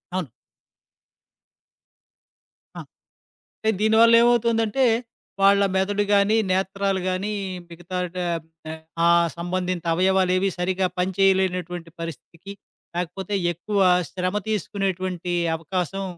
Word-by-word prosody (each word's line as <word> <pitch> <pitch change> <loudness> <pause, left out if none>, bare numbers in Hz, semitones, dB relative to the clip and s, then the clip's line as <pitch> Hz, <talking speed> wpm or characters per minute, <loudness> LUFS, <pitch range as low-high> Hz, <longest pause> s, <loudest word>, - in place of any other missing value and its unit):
అవును. 180 -8 -3 2.5
ఆ! - - -5 0.8
అంటే, 220 - +1
దీని 220 +1 +3
వల్లేవవుతోందంటే, 230 +1 +4 0.6
వాళ్ళ 200 0 +5
మెదడు 205 +2 +1
గానీ, 200 +2 +4 0.2
నేత్రాలు 195 +1 0
గానీ 185 +3 -2 0.4
మిగతా 175 +2 -6 0.2
డ - - -11 0.5
ఆహ్, 160 0 -7 0.3
ఆ - - +6 0.3
సంబంధిత 180 0 -3
అవయవాలేవీ 185 +1 +2
సరిగ్గా 185 +1 0
పనిచేయలేనటువంటి 180 -2 0
పరిస్థితికి, 165 +4 -8 0.4
లాకపోతే 180 +3 -4 0.2
ఎక్కువ 200 +5 -2 0.3
శ్రమ 185 0 -2
తీసుకునేటువంటి 185 -3 -2 0.2
అవకాశం 180 +4 -3
190 Hz, 90 wpm, -23 LUFS, 180-200 Hz, 2.5 s, ఆ